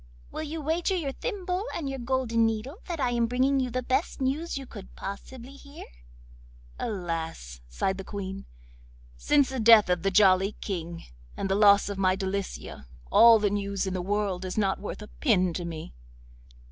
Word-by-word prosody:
will - - -5
you 315 +1 -5
wager 335 +5 0
your 305 -7 -2
thimble 375 - -3
and 310 - -3
your 270 0 -4
golden 240 -2 0
needle 225 - -1
that 340 -3 -4
I 250 -3 +1
am 235 -1 +1
bringing 260 +3 +2
you 255 -1 -1
the 255 +1 -3
best 265 +7 -1
news 280 +5 -1
you 270 - -6
could 205 -6 -11
possibly 235 +6 -8
hear?' 280 +1 -12 0.9
'Alas!' 165 - -4
sighed 190 - -2
the - - -5
Queen, 195 -1 -6 0.7
'since 285 - +2
the 265 -1 -4
death 220 -4 +7
of 180 -1 +1
the 195 - +1
Jolly 195 0 +4
King 170 -4 -5 0.3
and 195 - -2
the - - +4
loss 200 0 +5
of 200 -1 -4
my 185 -1 +3
Delicia, 190 - -5 0.2
all 230 0 +8
the 205 -2 0
news 200 -1 -2
in 190 - -3
the 185 - -2
world 195 -1 -1
is 185 +2 -5
not 195 -2 +1
worth 210 +1 -6
a - - -10
pin 185 - +1
to 175 +1 -4
me. 160 - -7
210 Hz, 185 wpm, -27 LUFS, 190-265 Hz, 0.9 s, all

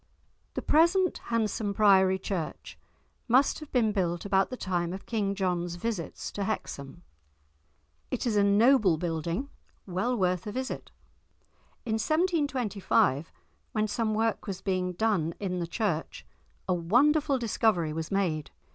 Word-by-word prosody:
The - - -3
present 340 +4 +3
handsome 220 -3 -1
priory 190 -2 +5
church 185 -4 -5 0.5
must 255 +4 +3
have 305 -2 -11
been 230 -4 +2
built 175 -4 -1
about 195 -1 +2
the 255 - -6
time 175 -4 -2
of 190 - -8
King 205 -4 -1
John's 175 -3 -1
visits 185 -2 -4
to 200 - -3
Hexham. 170 -6 -5 1.1
It - - -2
is 230 -3 0
a 205 - +4
noble 205 - +4
building, 170 - -2 0.4
well 200 +7 -1
worth 185 -1 0
a - - -3
visit. 260 +3 -4 1.0
In 220 -1 -1
1725, 260 - +1 0.4
when 215 -1 +1
some 215 0 -1
work 225 0 0
was 190 -2 -4
being 185 -2 -1
done 180 -5 0
in 180 -3 -2
the 170 - -2
church, 170 -4 -2 0.4
a 185 - +2
wonderful 275 - +3
discovery 215 -8 +1
was 160 0 -4
made. 175 -7 -1
200 Hz, 140 wpm, -28 LUFS, 175-230 Hz, 1.1 s, priory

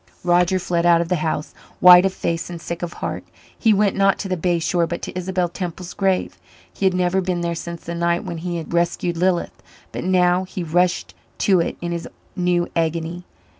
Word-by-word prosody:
Roger 180 +1 +3
fled 170 -2 -1
out 170 -1 +5
of 170 0 -2
the 180 - +1
house, 155 -1 -2 0.3
white 180 +1 +9
of - - -3
face 170 -3 -3
and 175 -1 -6
sick 170 +1 -6
of 175 -1 -4
heart. - - -4 0.3
He 225 - +2
went, 205 -1 +2
not 195 0 +3
to 200 - -5
the 185 - -1
bay 175 0 0
shore, 170 +1 0
but 170 - -5
to - - -6
Isabel 185 0 -1
Temple's 175 0 -6
grave. 195 -2 0 0.3
He 195 - +1
had 185 - +1
never 180 +1 +1
been 180 -1 -2
there 170 0 -1
since 170 0 -7
the 170 - -5
night 170 0 0
when 170 -1 -5
he 175 0 -3
had 165 0 -7
rescued 170 0 0
Lilith, 175 0 0 0.3
but - - -5
now 180 0 +3
he 185 -1 -6
rushed 175 +2 0 0.3
to 190 -3 +4
it 165 - -2
in 175 0 -3
his 170 -1 -4 0.3
new 175 -1 +1
agony. 165 +1 -2
175 Hz, 210 wpm, -21 LUFS, 170-185 Hz, 0.3 s, white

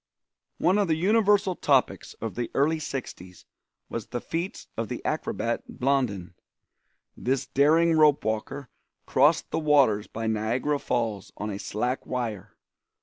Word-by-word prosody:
One 190 +4 +3
of 200 - +2
the 160 - +2
universal 200 +2 +3
topics 135 -6 +1
of 115 -2 -5
the 120 -1 -3
early 155 +4 +2
sixties 115 - -7 0.4
was 115 - -5
the 120 - -4
feats 170 +8 -4
of 115 0 -2
the - - -6
acrobat - - -3
Blondin. 125 -10 0 0.8
This 130 +1 -1
daring 160 +4 +3
rope 150 -2 +4
walker 110 +5 -3 0.3
crossed - - +3
the - - 0
waters 140 -9 +3
by 115 0 -5
Niagara 115 +7 0
Falls 110 -7 -2
on 105 +1 -4
a 100 - -5
slack 125 +6 -2
wire. 115 -7 -4
130 Hz, 140 wpm, -26 LUFS, 110-155 Hz, 0.8 s, rope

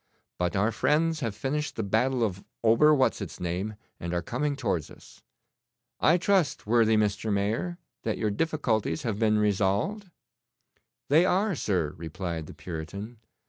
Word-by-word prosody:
But 90 +1 0
our 105 +4 +2
friends 155 +7 +1
have 115 -7 -3
finished 150 +6 -2
the 110 - -2
battle 120 +5 +1
of 95 -3 -2 0.2
Ober 115 +7 +6
what's 135 -6 +2
its 100 - -6
name, 90 +5 -3 0.2
and 85 +1 -3
are 85 - -1
coming 140 - -1
towards 100 - -1
us. - - -16 0.8
I 165 +3 +5
trust, 185 -3 +1
worthy 110 0 +4
Mr. 105 +1 0
Mayor, 105 - -1 0.2
that - - -2
your 105 -2 0
difficulties 145 0 0
have 110 -4 -2
been 110 -1 +3
resolved?' 105 - +1 1.0
'They 155 +5 +6
are, 195 +3 +2
sir,' 90 - -1
replied 85 -1 -5
the - - -11
Puritan. 100 +7 -7
110 Hz, 150 wpm, -28 LUFS, 100-145 Hz, 1.0 s, Ober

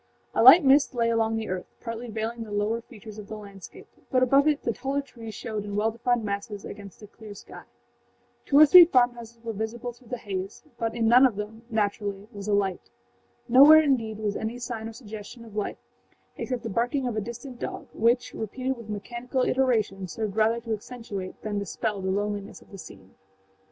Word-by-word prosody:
A - - +2
light 275 +9 +10
mist 275 0 +4
lay 230 -1 +2
along 225 -1 +1
the 220 -1 -4
earth, 185 -1 -4
partly 230 0 -6
veiling 225 +2 -4
the 225 - -7
lower 210 +3 -1
features 215 -1 -12
of 205 - -10
the 215 - -7
landscape, 200 -2 -12 0.2
but 255 -2 +3
above 275 +3 +4
it 300 -1 +1
the 235 - 0
taller 270 +5 -2
trees 225 -5 -10
showed 215 -4 -4
in 205 -1 -6
well 215 +2 +1
defined 235 +1 0
masses 200 0 -4
against 200 0 -10
a - - -10
clear 210 0 -12
sky. - - -12 0.8
Two 280 - +2
or 305 - +10
three 355 +4 +10
farmhouses 240 -6 0
were 230 -1 -4
visible 230 +3 -4
through 245 0 -21
the 250 - -4
haze, 195 -2 -6 0.2
but 225 -1 -2
in 230 -1 +1
none 245 +3 +7
of 235 - -6
them, 210 +2 -6
naturally, 205 -2 -2
was 200 0 -8
a 210 - +1
light. 195 -3 -1 0.6
Nowhere, 285 +6 +8
indeed, 230 -7 0
was 210 -2 -2
any 225 +2 -4
sign 235 -2 -5
or - - -10
suggestion 220 0 -10
of 215 -2 -14
life 210 - -3 0.6
except 250 -2 -4
the 225 - -4
barking 245 +6 0
of 245 -3 -2
a 215 - -1
distant 240 +3 -8
dog, - - -6
which, 240 +2 +1
repeated 255 +4 -3
with 230 -2 -11
mechanical 240 +5 -3
iteration, 220 -8 +1
served 205 +3 -4
rather 220 +1 +2
to 230 -1 -3
accentuate 210 -4 -7
than 210 -1 -2
dispel 200 0 -3
the 190 - -2
loneliness 205 +1 -3
of - - -21
the 195 - -10
scene. 95 - -13
225 Hz, 200 wpm, -26 LUFS, 205-245 Hz, 0.8 s, light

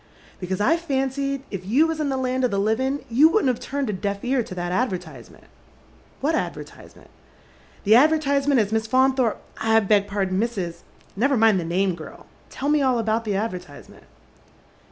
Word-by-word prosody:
'" - - -26
" - - -28
Because 185 +1 -3
I 325 +11 +3
fancied 275 -3 -2
if 195 -3 -5
you 245 +12 +3
was 325 -1 -2
in 300 -2 -1
the 265 - -1
land 255 0 -1
of 250 - +3
the 200 - -2
livia' 225 +7 0
you 270 +7 +5
vyouldn't 330 -6 +2
have 245 - -1
turned 280 -1 -3
a 210 - -2
deaf 200 +3 -4
ear 255 0 +1
to 195 -5 -8
that 175 0 -3
advertisement." 180 - -4 0.4
" - - -30
What - - +1
advertisement? - - -6 0.3
" 65 0 -29
" 65 - -28
The 210 - +4
advertisement 285 -1 +3
as 210 -2 0
Miss 220 0 0
Faunthoi 260 -2 +2
pe - - -19
— - - -29 0.2
I - - +7
beg 205 0 +2
pardon, 195 -2 -1
Mrs. 235 0 -1
It 170 0 -11 0.2
" - - -31
Never 265 +6 +2
mind 220 -3 +4
the - - -3
name, 185 +2 0
g^l. 160 -2 -11 0.3
Tell 280 - -3
me 300 -1 +3
all 260 -2 +2
about 225 0 -1
the 205 -2 -1
advertise 180 -8 -5
ment." - - -17
230 Hz, 215 wpm, -23 LUFS, 195-270 Hz, 0.4 s, I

